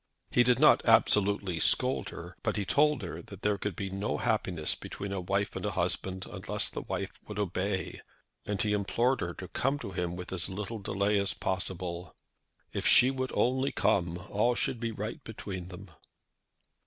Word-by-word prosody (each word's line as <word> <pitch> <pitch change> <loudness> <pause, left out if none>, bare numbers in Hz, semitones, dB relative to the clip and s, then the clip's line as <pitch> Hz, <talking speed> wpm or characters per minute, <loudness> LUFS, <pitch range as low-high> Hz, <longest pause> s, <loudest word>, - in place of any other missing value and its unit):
He 125 - +5
did 120 0 +4
not - - +6
absolutely 100 -4 +3
scold - - +2
her; - - -9
but - - -1
he 100 - -1
told 145 +4 +3
her 90 - -5
that - - -12
there 105 -1 +1
could 105 -4 -3
be 95 +1 -4
no 95 +2 -2
happiness 80 -4 0
between 100 0 -6
a 100 -1 -2
wife 100 +3 -1
and - - -4
a - - 0
husband 95 0 -1
unless - - -1
the - - -4
wife - - -3 0.2
would 105 - -6
obey, 95 -1 -2 0.4
and 100 -1 -3
he 105 -1 +1
implored 115 +6 +1
her 85 0 -3
to 90 - -7
come 135 +8 0
to 100 - -6
him 90 -1 -2
with 90 +1 -7
as 95 +1 +1
little 105 +3 -4
delay 100 +1 +1
as 100 - +1
possible. 90 -2 -3 0.6
If - - 0
she 125 +2 +7
would 130 -1 -2
only 130 +2 +2
come, 85 -2 +1
all 120 +4 +2
should 120 - 0
be 115 -1 -2
right 110 +1 -5
between 100 -5 -6
them. 90 +2 -10
100 Hz, 185 wpm, -30 LUFS, 95-110 Hz, 0.6 s, she